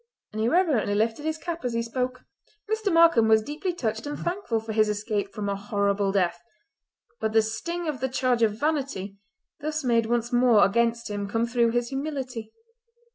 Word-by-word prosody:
and 215 - -3
he 225 - +2
reverently 295 - +2
lifted 225 +6 0
his 315 0 -1
cap 335 -1 -5
as 245 -1 -2
he 230 0 0
spoke. 255 +2 -3 0.5
Mr. 435 -1 0
Markam 330 -9 +5
was 220 -1 +5
deeply 300 - -3
touched 225 -7 -3
and 290 - -4
thankful 345 - -2
for 220 0 -6
his 215 0 +3
escape 210 0 -2
from 210 -2 -4
a 200 - 0
horrible 200 0 0
death; 180 -3 0 0.8
but 220 - -1
the 225 - +6
sting 335 +11 -4
of 295 -4 -2
the 265 +2 -1
charge 250 -2 +1
of 215 -1 +2
vanity 270 -10 -2 0.4
thus 305 +1 -3
made 230 -3 +2
once 240 +1 -1
more 240 -3 +5
against 235 +2 +1
him 205 -2 -4
came 225 +2 +1
through 235 -1 +2
his 240 0 -1
humility. 265 -5 -4
235 Hz, 185 wpm, -26 LUFS, 215-285 Hz, 0.8 s, the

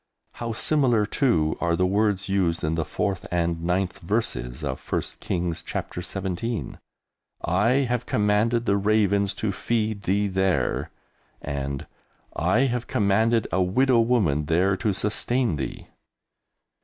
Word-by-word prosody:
How 115 -1 -5
similar, 120 -3 +2
too, 85 - +1
are 85 -1 +2
the 90 - +2
words 100 0 +1
used 95 -4 0
in 80 +1 0
the 80 0 0
4th 95 +3 -2
and 85 -1 0
9th 90 +3 -1
verses 85 - -2
of 65 -3 -3
1st - - -3
Kings, 85 -1 -2
Chapter - - -5
17: 95 +4 -4 0.6
"I 95 +7 +2 0.2
have 125 0 -2
commanded 110 +3 +2
the 100 -3 +2
ravens 100 -1 +2
to 110 - -1
feed 110 +1 -1
thee 100 +2 +1
there," 95 -8 0 0.5
and 70 -1 -4 0.5
"I 90 - +2
have 125 -3 0
commanded 110 0 +2
a 95 - +2
widow 120 +7 +3
woman 105 - +2
there 90 +5 +2
to 105 +2 0
sustain 110 - 0
thee!" - - -6
100 Hz, 135 wpm, -25 LUFS, 85-110 Hz, 0.6 s, widow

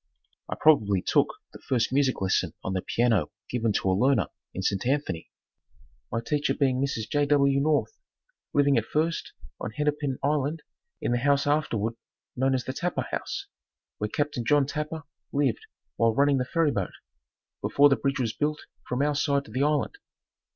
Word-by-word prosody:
I - - -2
probably 105 -12 +4
took - - +3 0.3
the - - -10
first 125 -2 0
music 135 -4 +2
lesson 95 -1 +1
on 95 - -2
the 95 - -1
piano 110 -11 +1 0.2
given 115 -2 +1
to 95 - +1
a - - +3
learner 120 +1 +2 0.2
in 95 - -5
St. 100 +4 0
Anthony, 135 - -1 0.8
my 115 - -1
teacher 150 +2 0
being 130 -2 +1
Mrs. 125 -6 -1
J. 145 +4 +1
W. 140 -1 +4
North, 155 - +1 0.5
living 140 -3 +4
at 110 - -6
First 160 +5 -1 0.3
on - - -3
Hennepin 145 +2 -1
Island 150 +2 0 0.4
in - - 0
the 120 - +2
house 140 +2 +2
afterward 130 -7 0 0.4
known 130 +1 +2
as 130 - -1
the 130 - -3
Tapper 180 +4 -2
House, - - -3 0.5
where 105 - -1
Capt. 145 +2 -1
John 145 +3 +4
Tapper 150 +3 -4 0.3
lived 140 -5 0 0.3
while 115 -1 +3
running 140 0 +4
the 125 - 0
ferry 165 +2 +2
boat, 100 -7 -2 0.7
before 145 +1 +5
the 135 - +4
bridge 135 -1 -1
was 115 -4 0
built 150 0 -1 0.3
from 125 +3 0
our 150 0 +2
side 140 -1 +1
to - - -13
the 130 +4 -1
island. 150 - +1
140 Hz, 175 wpm, -27 LUFS, 115-145 Hz, 0.8 s, before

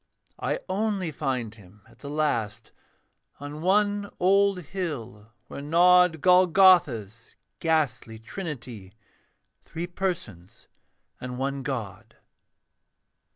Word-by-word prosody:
I - - -2
only 195 -4 -1
find 130 -7 -3
him 100 -1 -18
at - - -22
the 140 - -8
last, 145 -8 -2 0.7
On 145 +2 -8
one 205 +2 +1
old 195 +1 +3
hill 140 - -6
where - - -8
nod 175 +1 +4
Golgotha's 175 - +4 0.2
ghastly 135 -9 -1
trinity 120 - -8 0.7
Three 165 +1 -6
persons 175 - -5 0.5
and 125 0 -6
one 135 +1 -2
god. 115 -9 -6
150 Hz, 95 wpm, -26 LUFS, 115-180 Hz, 0.7 s, nod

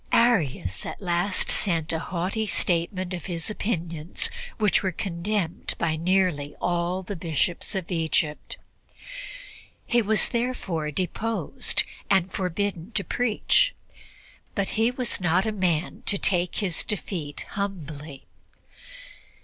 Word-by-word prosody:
Arius 155 - +3
at - - -5
last 180 +1 +1
sent 165 -5 +1
a 160 - +1
haughty 185 +6 -1
statement 180 0 0
of 175 - -4
his 170 +2 -2
opinions, 170 -7 -1 0.3
which 210 -3 +4
were 190 - +1
condemned 180 0 -1
by 160 -2 +1
nearly 170 -4 +2
all 175 +1 0
the 200 +2 -4
Bishops 170 +3 0
of 190 -1 -2
Egypt. 160 -2 0 1.3
He 240 0 +4
was 215 0 +3
therefore 230 -10 -1
deposed 205 +8 0 0.3
and 190 -1 +4
forbidden 185 -1 -1
to 200 - +1
preach, 250 - +3 0.8
but 200 -2 +1
he 225 +1 +3
was 250 -4 -2
not 175 +2 +4
the 220 - 0
man 180 -5 0
to 200 - +5
take 180 -2 +2
his 185 -6 0
defeat 175 -7 -4
humbly. 155 -8 -4
180 Hz, 120 wpm, -26 LUFS, 165-205 Hz, 1.3 s, to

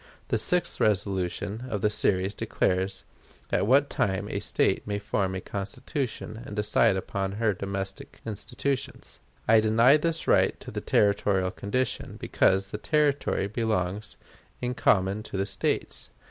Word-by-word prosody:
The - - +2
sixth 175 -1 0
resolution 100 +2 0
of 105 -4 -2
the 105 - +2
series 95 -1 +1
declares 95 -1 -1 0.5
at 100 - +1
what 140 +4 +5
time 100 -3 -1
a - - -1
State - - +1
may 100 0 -1
form 100 -2 -1
a 95 - -3
Constitution 110 - -4
and 105 - -8
decide 105 0 +3
upon 95 +1 -3
her 105 0 +1
domestic 95 0 -5
institutions. 120 +5 -4 0.3
I 110 0 +7
deny 115 +6 +5
this 165 +1 -2
right - - +3
to - - -9
the - - -4
territorial 100 -2 +2
condition, 115 +6 -2
because 95 +1 +2
the 105 - -4
Territory 145 -7 +1
belongs 105 -2 -2 0.4
in 125 0 -2
common 100 -2 +2
to 105 - -6
the 95 - 0
States. 100 - -2
105 Hz, 145 wpm, -27 LUFS, 95-115 Hz, 0.5 s, I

